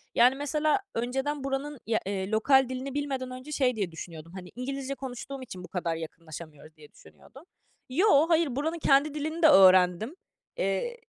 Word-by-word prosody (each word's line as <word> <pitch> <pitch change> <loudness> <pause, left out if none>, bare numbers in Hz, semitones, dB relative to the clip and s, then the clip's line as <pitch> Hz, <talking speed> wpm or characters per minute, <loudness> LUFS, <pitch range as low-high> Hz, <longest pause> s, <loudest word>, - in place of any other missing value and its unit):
Yani, 250 +3 +5
mesela, 300 +5 0
önceden 265 +5 -2
buranın, 275 +2 -2
ııı, 285 - -12
ya 225 - +1
lokal 220 +7 +2
dilini 260 +1 -5
bilmeden 270 -3 -3
önce 255 +4 -9
şey 255 -4 +1
diye 195 -5 -2
düşünüyordum. 165 -1 -9
Hani, 180 -1 -9
İngilizce 275 +2 -4
konuştuğum 265 +1 -7
için 185 -7 -9
bu - - -9
kadar 170 -3 -2
yakınlaşamıyoruz 160 -1 -10
diye 150 -1 -16
düşünüyordum. 270 +4 -17 0.5
Yo, 320 +1 +4
hayır. 320 -6 +2
Buranın 320 +5 -2
kendi 285 0 +3
dilini 315 +3 -4
de - - +9
öğrendim. 185 - +5 0.4
Eee, 195 - -1
260 Hz, 160 wpm, -28 LUFS, 190-285 Hz, 0.5 s, de